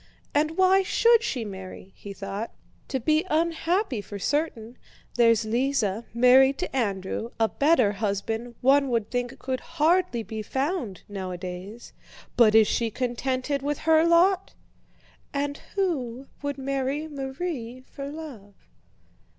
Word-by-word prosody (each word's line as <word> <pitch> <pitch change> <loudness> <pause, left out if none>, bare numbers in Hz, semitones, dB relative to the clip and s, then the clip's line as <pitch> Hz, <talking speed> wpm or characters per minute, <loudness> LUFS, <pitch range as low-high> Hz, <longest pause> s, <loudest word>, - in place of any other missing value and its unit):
"And 305 +2 +1
why 375 +1 +5
should 465 +4 +4
she 250 - -2
marry?" 190 -1 -9
he 200 - -9
thought. 195 +3 -5 0.4
"To 265 - -2
be 310 +6 +2
unhappy 330 - 0
for 205 0 -8
certain. 245 - -2 0.3
There's 230 -2 +4
Lise, 255 +3 +1 0.3
married 260 +3 +5
to - - -4
Andrew—a 220 0 -1
better 265 - +3
husband 220 +3 -3
one 275 +1 +4
would 230 -4 -1
think 245 -1 -2
could 260 -1 -3
hardly 330 -5 +1
be 220 0 -5
found 265 - -3
nowadays—but 195 +4 -2
is 220 -1 +7
she 230 -1 0
contented 255 +4 -2
with 290 +1 -1
her 320 0 +5
lot? 350 +3 +3 0.8
And 285 0 -1 0.2
who 275 - -1 0.2
would 285 -1 -3
marry 275 +2 -2
Marie 270 -3 -5
for 275 +2 -8
love? 270 -11 -9
260 Hz, 125 wpm, -26 LUFS, 220-305 Hz, 0.8 s, is